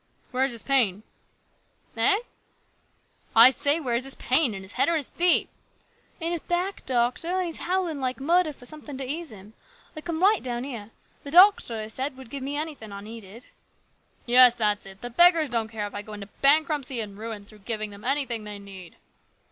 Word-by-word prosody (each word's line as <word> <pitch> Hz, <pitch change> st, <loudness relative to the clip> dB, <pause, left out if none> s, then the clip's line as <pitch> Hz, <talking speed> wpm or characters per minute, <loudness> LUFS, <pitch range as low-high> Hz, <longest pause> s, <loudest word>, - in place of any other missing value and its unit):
" -, -, -37 dB
Where 255 Hz, 0 st, 0 dB
is 270 Hz, -, +1 dB
his 230 Hz, -2 st, -3 dB
pain? 220 Hz, -8 st, +1 dB, 0.5 s
" -, -, -39 dB
"Eh?" 410 Hz, +2 st, +3 dB, 0.6 s
" -, -, -38 dB
I 255 Hz, -, +9 dB
say 285 Hz, +4 st, +2 dB
where 255 Hz, -7 st, -2 dB
is 235 Hz, +2 st, +1 dB
his 270 Hz, -, 0 dB
pain? 260 Hz, -4 st, +1 dB
In 190 Hz, -, -8 dB
his 190 Hz, -, -8 dB
head -, -, +2 dB
or 335 Hz, -1 st, +1 dB
feet?" 350 Hz, +6 st, +3 dB, 0.4 s
" -, -, -37 dB
In 335 Hz, 0 st, -2 dB
his 345 Hz, -, -1 dB
back, 355 Hz, +4 st, -3 dB
doctor; 245 Hz, +5 st, 0 dB
an' 370 Hz, +1 st, 0 dB
he 350 Hz, -, -3 dB
is 325 Hz, -, 0 dB
hovvlin' 355 Hz, -4 st, -2 dB
like 255 Hz, -1 st, -3 dB
murder 335 Hz, +3 st, +2 dB
for 255 Hz, -3 st, -15 dB
somethin' 295 Hz, 0 st, -5 dB
to 265 Hz, -1 st, -5 dB
ease 320 Hz, +4 st, -4 dB
him. 210 Hz, +1 st, -14 dB, 0.4 s
I 310 Hz, -, -7 dB
come 335 Hz, +1 st, -4 dB
right 415 Hz, +2 st, +4 dB
down 240 Hz, -1 st, -4 dB
here. 235 Hz, -6 st, -7 dB, 0.3 s
The 285 Hz, -, -8 dB
doctor, 355 Hz, -, +5 dB
he -, -, -6 dB
said, 260 Hz, +4 st, -4 dB
would 260 Hz, -3 st, -13 dB
give 280 Hz, -, -5 dB
me 280 Hz, +2 st, -3 dB
anything 295 Hz, -9 st, -6 dB
I 200 Hz, 0 st, -8 dB
needed." 220 Hz, +1 st, -11 dB, 0.4 s
" -, -, -40 dB
Yes, 245 Hz, 0 st, +7 dB
that's 210 Hz, -4 st, -1 dB
it. 195 Hz, 0 st, -14 dB
The 245 Hz, +1 st, -7 dB
beggars 335 Hz, +2 st, +5 dB
don't 230 Hz, -2 st, -1 dB
care 220 Hz, -2 st, -4 dB
if 205 Hz, -, -8 dB
I 205 Hz, -, -5 dB
go 215 Hz, +1 st, -11 dB
into 205 Hz, -1 st, -9 dB
bankruptcy 285 Hz, -3 st, +2 dB
and 205 Hz, -3 st, -4 dB
ruin 215 Hz, -1 st, -7 dB
through 215 Hz, 0 st, -16 dB
giving 215 Hz, 0 st, -5 dB
them 200 Hz, 0 st, -13 dB
anything 260 Hz, -4 st, -1 dB
they 210 Hz, -1 st, -7 dB
need." 195 Hz, -3 st, -12 dB
255 Hz, 220 wpm, -25 LUFS, 215-310 Hz, 0.6 s, I